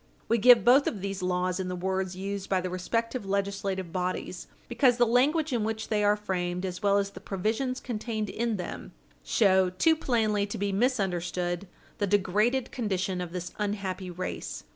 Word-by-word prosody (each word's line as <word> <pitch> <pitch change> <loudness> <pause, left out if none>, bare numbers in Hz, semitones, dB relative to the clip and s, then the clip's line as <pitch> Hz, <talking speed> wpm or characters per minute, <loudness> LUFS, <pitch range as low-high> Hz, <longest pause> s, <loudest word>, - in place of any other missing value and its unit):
We 230 - +2
give 240 -2 +7
both 265 +4 +6
of 205 - -2
these 195 0 -4
laws 180 0 0
in 185 - -2
the 180 - -3
words 190 0 -2
used 195 +1 -4
by 190 - +2
the 180 0 -4
respective 230 +6 -2
legislative 195 -2 -2
bodies 185 +1 -3 0.2
because 250 -4 +3
the 240 - +5
language 280 +6 +2
in 230 -3 +1
which 220 0 -3
they 210 -1 +1
are 205 0 +4
framed, 180 -3 -2
as 180 +1 -5
well 200 -1 +3
as 200 0 0
the - - -10
provisions 225 +7 -2
contained 220 -2 -3
in 230 +1 -1
them, 180 - -6 0.3
show, 190 -4 +3
too 255 - +3
plainly 220 -8 +1
to 205 - -5
be 200 +1 -1
misunderstood 185 -5 -1 0.3
the 205 - +1
degraded 210 +6 +1
condition 190 -5 -2
of 175 -2 -5
this 180 0 -5
unhappy 195 -3 -3
race. 180 +1 -5
200 Hz, 180 wpm, -28 LUFS, 185-225 Hz, 0.3 s, give